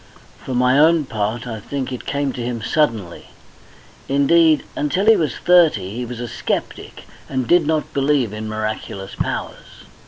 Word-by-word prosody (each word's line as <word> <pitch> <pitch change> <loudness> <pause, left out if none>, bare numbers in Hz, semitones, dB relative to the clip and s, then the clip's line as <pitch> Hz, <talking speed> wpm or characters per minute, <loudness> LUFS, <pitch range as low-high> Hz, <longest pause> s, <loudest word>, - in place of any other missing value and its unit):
For 130 - -4
my 125 +2 +3
own 160 0 +4
part, 110 0 -3
I 115 -3 -5
think 130 +4 -5
it 125 - -8
came 140 -2 -1
to 125 - -6
him 120 -2 -4
suddenly. 115 - -1 0.8
Indeed, 155 +3 +4
until 180 +7 0
he 225 0 +7
was 150 - -1
thirty 155 - +3
he 125 +1 -3
was 120 0 -7
a 120 - -4
sceptic, - - -4 0.3
and 130 -2 -1
did 175 -3 +4
not 155 -1 -1
believe 135 -5 +1
in 110 0 -5
miraculous 110 -2 -5
powers. - - -5
130 Hz, 160 wpm, -20 LUFS, 115-150 Hz, 0.8 s, he